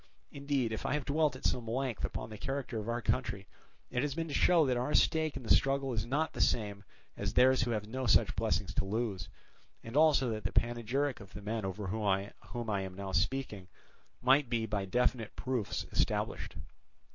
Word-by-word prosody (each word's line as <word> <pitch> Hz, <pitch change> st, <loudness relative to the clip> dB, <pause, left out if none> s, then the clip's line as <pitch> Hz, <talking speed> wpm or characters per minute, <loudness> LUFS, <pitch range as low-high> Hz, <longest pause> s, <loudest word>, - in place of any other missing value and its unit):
"Indeed 140 Hz, -4 st, -1 dB
if 110 Hz, -, -3 dB
I -, -, 0 dB
have 150 Hz, -, -2 dB
dwelt 150 Hz, -1 st, +2 dB
at 130 Hz, -, -9 dB
some 120 Hz, -2 st, 0 dB
length 125 Hz, 0 st, -2 dB
upon -, -, -3 dB
the 110 Hz, -, -7 dB
character 135 Hz, -3 st, -3 dB
of 110 Hz, +2 st, -5 dB
our 120 Hz, 0 st, -2 dB
country, 100 Hz, -6 st, -1 dB, 0.5 s
it 125 Hz, -, 0 dB
has 145 Hz, -1 st, -1 dB
been 165 Hz, 0 st, -2 dB
to -, -, -4 dB
show 170 Hz, 0 st, +5 dB
that 130 Hz, -2 st, +1 dB
our 125 Hz, +4 st, 0 dB
stake 160 Hz, -3 st, +2 dB
in 135 Hz, -, -7 dB
the 115 Hz, -, +5 dB
struggle 135 Hz, -1 st, +2 dB
is 110 Hz, 0 st, -2 dB
not 150 Hz, +5 st, 0 dB
the -, -, -2 dB
same 105 Hz, -3 st, +1 dB, 0.3 s
as -, -, -3 dB
theirs 130 Hz, +1 st, +5 dB
who 125 Hz, -, 0 dB
have 105 Hz, -3 st, -1 dB
no 130 Hz, +3 st, -3 dB
such -, -, +4 dB
blessings -, -, 0 dB
to -, -, 0 dB
lose, 100 Hz, -3 st, -2 dB, 0.5 s
and 115 Hz, +3 st, -8 dB
also 150 Hz, -5 st, +5 dB
that 110 Hz, -1 st, -4 dB
the -, -, -1 dB
panegyric 120 Hz, +4 st, 0 dB
of 100 Hz, -2 st, -13 dB
the 105 Hz, -, -8 dB
men 110 Hz, 0 st, -2 dB
over 95 Hz, +2 st, -4 dB
whom 105 Hz, +4 st, -2 dB, 0.7 s
I 100 Hz, -1 st, 0 dB
am 95 Hz, -1 st, -6 dB
now 100 Hz, 0 st, -5 dB
speaking 95 Hz, +1 st, -1 dB, 0.6 s
might 135 Hz, +1 st, +4 dB
be 115 Hz, -2 st, 0 dB
by 100 Hz, -3 st, -2 dB
definite 115 Hz, +2 st, 0 dB
proofs 125 Hz, -5 st, -2 dB
established. -, -, -1 dB
120 Hz, 205 wpm, -32 LUFS, 105-135 Hz, 0.7 s, show